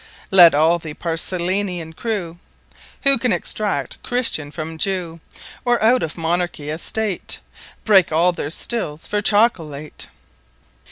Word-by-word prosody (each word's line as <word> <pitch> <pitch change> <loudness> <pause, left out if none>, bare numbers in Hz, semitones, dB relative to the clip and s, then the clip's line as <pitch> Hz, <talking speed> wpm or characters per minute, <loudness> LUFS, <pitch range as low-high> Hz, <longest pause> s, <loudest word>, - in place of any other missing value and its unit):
Let 175 -5 +8
all 160 +3 +3
the 155 -2 -8
Paracelsian 175 0 -2
Crew 175 -5 -4 0.6
Who 275 -3 +5
can 245 0 +1
Extract 210 -2 -2
Christian 235 - 0
from 160 +1 -6
Jew; 180 -4 -2 0.4
Or 245 -1 +2
out 245 +3 +4
of 160 - -4
Monarchy, 165 -2 -1
A 155 - -4
State, 215 0 -2 0.5
Breake 195 -4 +5
`all 175 +3 +2
their 145 - -3
Stills 160 -3 -3
for 210 0 -1
Chocolate. 165 -10 0
175 Hz, 125 wpm, -20 LUFS, 160-210 Hz, 0.6 s, Let